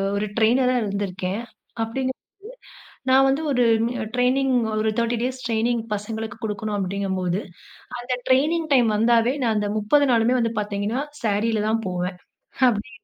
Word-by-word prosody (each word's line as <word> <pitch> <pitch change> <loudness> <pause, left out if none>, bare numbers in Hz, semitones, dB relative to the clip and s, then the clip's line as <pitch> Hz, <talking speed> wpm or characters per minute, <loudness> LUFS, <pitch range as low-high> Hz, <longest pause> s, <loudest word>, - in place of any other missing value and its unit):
ஒரு 205 +1 0
ட்ரெயினரா 250 +3 +3
இருந்திருக்கேன். 200 0 -3 0.4
அப்டீங்கம்போது 260 +3 -3 0.9
நான் 265 +1 +6
வந்து 275 +4 +1
ஒரு 250 -3 +3 0.5
ட்ரெய்னிங் 260 +2 +2 0.3
ஒரு 220 0 +1
30 235 +1 +1
டேஸ் 255 +1 -3
ட்ரெய்னிங் 230 +1 0
பசங்களுக்கு 220 +1 -5
குடுக்கணும் 210 0 -3
அப்படிங்கும்போது, 190 -1 -1 0.6
அந்த 245 +1 -2
ட்ரெயினிங் 310 +6 +2
டைம் 245 -4 +5
வந்தாவே, 230 +2 +3
நான் 225 -2 +2
அந்த 210 -1 0
30 285 +8 +3
நாளுமே 235 +1 +3
வந்து 230 -1 +1
பாத்தீங்கன்னா, 210 +3 -2 0.2
சாரீல 215 0 +1
தான் 225 +1 +1
போவேன். 180 0 -3 0.5
அப்படி 215 -1 -3
225 Hz, 135 wpm, -23 LUFS, 205-250 Hz, 0.9 s, நான்